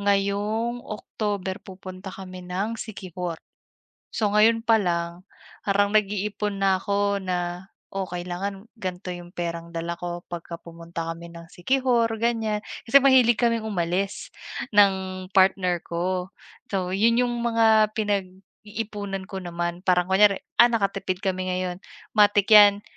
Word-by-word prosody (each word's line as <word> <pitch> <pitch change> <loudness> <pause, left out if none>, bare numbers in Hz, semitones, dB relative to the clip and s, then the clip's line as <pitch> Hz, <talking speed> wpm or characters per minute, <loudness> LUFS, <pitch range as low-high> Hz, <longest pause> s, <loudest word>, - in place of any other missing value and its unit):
ngayong 205 +4 0
October 205 -3 -4
pupunta 185 -1 -9
kami 185 -1 -9
ng 195 +6 -3
Siquijor. 180 -6 -6 0.7
So, 210 -3 0
ngayon 225 +2 +4
pa 225 -1 +5
lang 170 -2 -2 0.4
parang 205 +1 +1
nag-iipon 210 0 0
na 195 -1 +3
ako 200 -1 0
na, 180 0 -3 0.2
oh, 195 -1 -1
kailangan 180 +4 -5
ganto 185 -1 -5
'yong 175 0 -10
perang 170 -1 -4
dala 170 +1 -3
ko 175 0 -5
'pagka 170 -1 -7
pumunta 165 0 -7
kami 170 +1 -8
ng 170 0 -11
Siquijor 245 +3 +1
ganyan, 225 -2 0 0.3
kasi 275 +5 +7
mahilig 255 -4 +5
kaming 230 -2 +1
umalis 185 0 -2 0.4
ng 190 -2 +3
partner 185 -2 +3
ko. 180 +2 -2 0.4
So, 185 -2 -1
'yon 230 +4 +3
'yong 245 -1 +1
mga 220 -2 +4
pinag-iipunan 205 0 -4
ko 195 -2 -6
naman 175 0 -4
parang 180 -2 +2
kunyari, 195 0 +5 0.2
"Ah, 240 0 +8
nakatipid 195 -4 -1
kami 185 -1 -1
ngayon." 180 -1 -2 0.4
matik 205 -1 +4
yan 205 -1 +8
195 Hz, 130 wpm, -25 LUFS, 180-210 Hz, 0.7 s, Ah